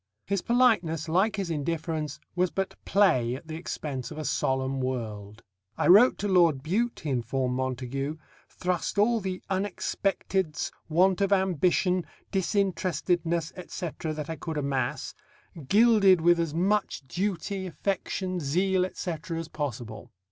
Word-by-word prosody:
His 200 -1 0
politeness, 210 - +2
like 190 +7 +2
his 195 -4 -3
indifference, 155 -1 -2 0.2
was 180 0 +2
but 195 +4 -2
play 130 -12 +3
at 135 - -10
the 155 - -5
expense 145 -6 -5
of 155 - -9
a 155 - -4
solemn 130 0 0
world. 110 -5 -4 0.3
"I - - +2
wrote 210 +8 +7
to 205 - -2
Lord 170 -8 +4
Bute," 225 +10 -1
he 150 - -2
informed 125 0 -1
Montagu; 130 +3 -3 0.3
"thrust 180 +1 -2
all 225 +3 +4
the 185 -2 -4
unexpecteds, 190 -3 -1 0.2
want 185 +4 +3
of 200 0 +2
ambition, 185 -1 +2 0.3
disinterestedness, 180 -4 0
etc., 175 -3 -5
that 150 -1 -5
I 160 -1 -4
could 160 -1 -5
amass, 135 -4 -2 0.5
gilded 205 - +6
with 170 +1 +4
as 165 -2 -1
much 190 -5 0
duty, 190 +2 -2
affection, 185 0 -2
zeal, 180 +5 +1
etc., 165 -2 -5
as 165 -1 -5
possible." 120 -8 -5
170 Hz, 135 wpm, -27 LUFS, 145-190 Hz, 0.5 s, wrote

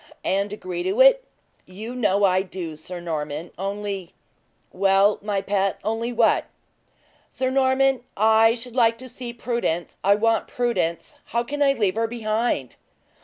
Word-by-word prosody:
"And 200 +1 0
agree 185 -4 -5
to 395 - -1
it?" - - +7 0.4
"You 215 +6 -8
know 205 -5 +1
I 185 -1 +4
do, 180 -4 -6
Sir 175 +4 -8
Norman; 155 -1 -4
only 195 -1 -5 0.3
" - - -43 0.3
"Well, 195 +2 +3
my 200 -1 -2
pet, 195 -1 0
only 225 +3 -2
what?" 235 -2 +3 0.8
"Sir 260 0 -2
Norman, 265 -1 +2 0.2
I 220 +2 +5
should 245 0 -6
like 230 -2 +3
to 255 +2 -10
see 245 -1 -6
Prudence. 235 -8 -3
I 200 +1 +5
want 225 +2 +1
Prudence. 235 -9 -2
How 235 +1 -1
can 290 +4 -5
I 275 -1 +5
leave 210 -7 +1
her 225 +1 0
behind?" 220 - -2
215 Hz, 155 wpm, -23 LUFS, 190-240 Hz, 0.8 s, it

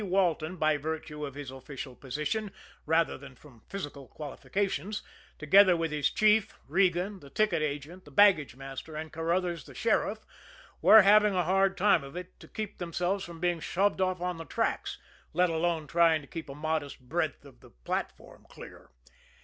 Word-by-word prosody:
Walton, 180 -3 +1
by 155 -3 +2
virtue 150 0 -5
of 140 - -10
his 145 -3 -7
official 135 0 -8
position, 150 - -3 0.4
rather 160 -2 +2
than 135 -1 -12
from 125 -4 -18
physical 145 -8 -6
qualifications, 195 +7 -3 0.3
together 185 +4 +6
with 165 -1 -1
his 150 -2 +1
chief, 215 -1 +3
Regan, 190 +1 +1
the 140 - -14
ticket 195 -2 +1
agent, 155 +5 -4
the - - -13
baggage 155 -5 +4
master 135 +3 -8
and 155 +1 -6
Carruthers, 170 +1 -1
the - - -13
sheriff, 220 -2 0 0.6
were 220 -1 +9
having 210 0 +5
a 180 - +2
hard 195 +2 +2
time 200 -6 +4
of 140 +3 -10
it 180 0 -8
to - - -13
keep 215 -1 -6
themselves 180 +3 -1
from 170 -1 -9
being 175 -1 0
shoved 195 +4 0
off 185 -1 0
on 180 -1 -2
the 165 - -7
tracks, - - -2 0.4
let 180 +1 +3
alone 165 -1 0
trying 165 0 +3
to 145 - -15
keep 160 -1 -7
a 135 - -7
modest 150 -1 -3
breadth 170 +6 -2
of - - -16
the - - -17
platform - - -6
clear. - - -12
165 Hz, 175 wpm, -29 LUFS, 150-190 Hz, 0.6 s, were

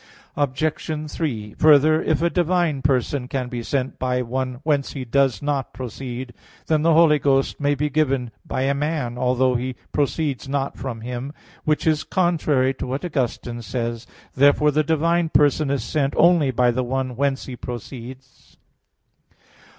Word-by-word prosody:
Obj. 150 +2 -2
3: 110 -10 -3
Further, 155 +1 +6
if 160 +1 0
a 170 - +3
divine 175 -5 +1
person 130 -1 0
can 130 -1 -3
be 120 -1 -4
sent 130 +2 -2
by 125 0 0
one 130 +1 -3
whence 145 -3 0
He 130 -3 -5
does 135 +1 +1
not 140 -3 -2
proceed, 125 0 -6 0.3
then 155 -2 +2
the 165 0 +4
Holy 160 -2 +5
Ghost 135 -1 +1
may 145 0 +1
be 150 +2 0
given 135 -5 0
by 130 - -2
a 135 +1 +2
man, 140 -4 -2
although 125 +1 +2
He 125 +1 -2 0.2
proceeds 145 -2 -1
not 140 0 -1
from 120 -4 -6
him; 125 +4 -5 0.3
which 150 -1 +1
is 155 -1 +2
contrary 155 -7 +1
to - - -3
what 135 +7 -3
Augustine 120 -6 -2
says 115 +1 -4
(De - - -27
Trin. - - -24 0.2
xv). - - -38
Therefore 145 +2 +5
the 155 +2 +2
divine 165 +2 +1
person 145 -1 +3
is 140 -1 -1
sent 140 -2 -1
only 170 -5 +5
by 125 -1 +3
the 130 +2 -1
one 130 0 -2
whence 135 +1 0
He 130 - -7
proceeds. 125 +2 -9
135 Hz, 170 wpm, -22 LUFS, 125-150 Hz, 0.3 s, Further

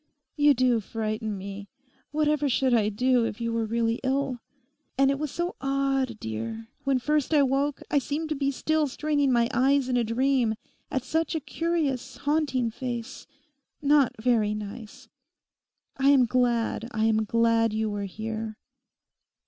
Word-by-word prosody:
You 290 -1 +5
do 250 -2 +3
frighten 215 0 -3
me. 200 +1 -8 0.4
Whatever 300 -1 +1
should 260 0 +2
I 215 -3 +3
do 250 +3 +2
if 230 -1 -3
you 230 0 -2
were 225 -1 -1
really 230 +1 0
ill? 265 -1 0 0.6
And 275 0 +4
it 275 - -2
was 305 -1 -2
so 345 +5 -3
odd, 270 -3 0
dear. 115 - -5 0.2
When 275 -1 +3
first 300 +3 0
I 290 - +6
woke 275 +2 0
I 290 - +4
seemed 295 +4 -3
to 305 - -1
be 275 0 0
still 310 +2 0
straining 290 0 0
my 235 -1 +3
eyes 265 +1 +3
in 250 - +1
a 240 - +2
dream, 240 0 +1 0.3
at 260 - -2
such 320 +3 -1
a - - +1
curious, 285 -5 -2
haunting 275 -5 0
face—not 275 +3 -2
very 220 -3 +2
nice. 210 +1 -8 0.9
I 270 +1 +3
am 270 -3 +6
glad, 235 -1 0
I 220 0 +1
am 220 -1 +2
glad 230 +1 +2
you 220 +1 -1
were 205 -1 -3
here. 220 +2 -5
255 Hz, 155 wpm, -26 LUFS, 225-280 Hz, 0.9 s, I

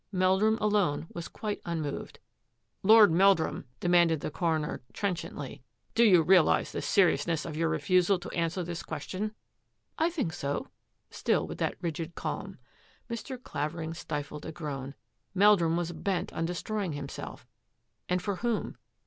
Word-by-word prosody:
Meldrum 190 +3 +3
alone 205 -9 +1
was 170 -1 -5
quite 210 -2 -5
xanaawed. 160 -4 -4
^^ - - -17 0.7
Lord 215 -1 +8
Meldrum," 190 0 +3
demanded 170 -3 +3
the - - -3
coroner 160 -2 -1
trenchantly, 170 -9 -4 0.2
" - - -43
do 235 - +4
you 185 -7 +6
realise 180 0 +4
the - - -3
seriousness 170 -4 +2
of 160 - -5
your 165 +1 +1
refusal 185 +2 +3
to 175 - -8
answer 170 +1 -1
this 170 0 -5
question? 210 +3 -4 0.2
" - - -49
" - - -48
I 325 +2 +3
think 280 - -2
so," 140 -4 -3 0.4
still - - +1
with - - -7
that - - 0
rigid 165 0 -3
calm. - - -4 0.5
Mr. 245 +2 -5
Clavering 160 - -4
stifled 150 -2 -5
a - - -4
groan. 140 -4 -5 0.4
Meldrum 185 -4 +5
was 175 -1 -2
bent 185 +2 -2
on 165 - -1
destroying 185 +1 -2
himself 140 -1 -7 0.3
— - - -49
and 180 0 0
for 200 -3 -2
whom? 235 -1 -2
175 Hz, 155 wpm, -29 LUFS, 160-200 Hz, 0.7 s, Lord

